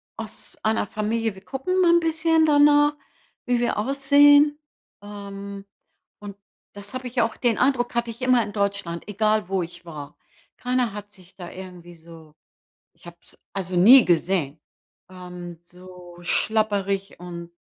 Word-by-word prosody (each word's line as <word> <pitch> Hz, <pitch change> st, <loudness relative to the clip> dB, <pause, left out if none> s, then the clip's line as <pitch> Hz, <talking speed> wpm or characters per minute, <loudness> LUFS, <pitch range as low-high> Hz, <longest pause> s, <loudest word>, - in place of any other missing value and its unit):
aus 225 Hz, -1 st, -9 dB
einer 220 Hz, -1 st, 0 dB
Familie 220 Hz, +1 st, -2 dB
wir 190 Hz, -, -15 dB
gucken 275 Hz, -, -2 dB
mal 345 Hz, -2 st, +5 dB
'n 340 Hz, -, +5 dB
bisschen 325 Hz, 0 st, +2 dB
danach, 295 Hz, 0 st, +4 dB, 0.5 s
wie 245 Hz, -1 st, +1 dB
wir 240 Hz, -, -1 dB
aussehen. 285 Hz, +4 st, +4 dB, 0.4 s
Ähm, 200 Hz, -1 st, -9 dB, 0.5 s
und 205 Hz, -1 st, -10 dB, 0.4 s
das 205 Hz, +2 st, -10 dB
habe 255 Hz, 0 st, -5 dB
ich 245 Hz, 0 st, -1 dB
auch 225 Hz, -1 st, -1 dB
den 235 Hz, -3 st, 0 dB
Eindruck 250 Hz, -2 st, 0 dB
hatte 235 Hz, 0 st, -1 dB
ich 230 Hz, +3 st, -14 dB
immer 255 Hz, -1 st, +3 dB
in 205 Hz, -1 st, -8 dB
Deutschland, 200 Hz, -5 st, -3 dB
egal 215 Hz, -1 st, 0 dB
wo 195 Hz, -1 st, 0 dB
ich 175 Hz, +1 st, -9 dB
war. 150 Hz, -4 st, -10 dB, 0.4 s
Keiner 250 Hz, -3 st, -1 dB
hat 205 Hz, 0 st, -9 dB
sich 185 Hz, -3 st, -20 dB
da 175 Hz, -2 st, -9 dB
irgendwie 180 Hz, -2 st, -11 dB
so 160 Hz, -2 st, -16 dB, 0.6 s
ich 165 Hz, +1 st, -18 dB
hab's 170 Hz, 0 st, -13 dB
also 185 Hz, -2 st, -4 dB
nie 240 Hz, +8 st, +8 dB
gesehen 165 Hz, -3 st, 0 dB, 0.5 s
ähm, 180 Hz, -2 st, -10 dB
so 180 Hz, 0 st, -15 dB
schlabberig 200 Hz, 0 st, -1 dB
und 170 Hz, -1 st, -8 dB
205 Hz, 150 wpm, -23 LUFS, 180-250 Hz, 0.6 s, nie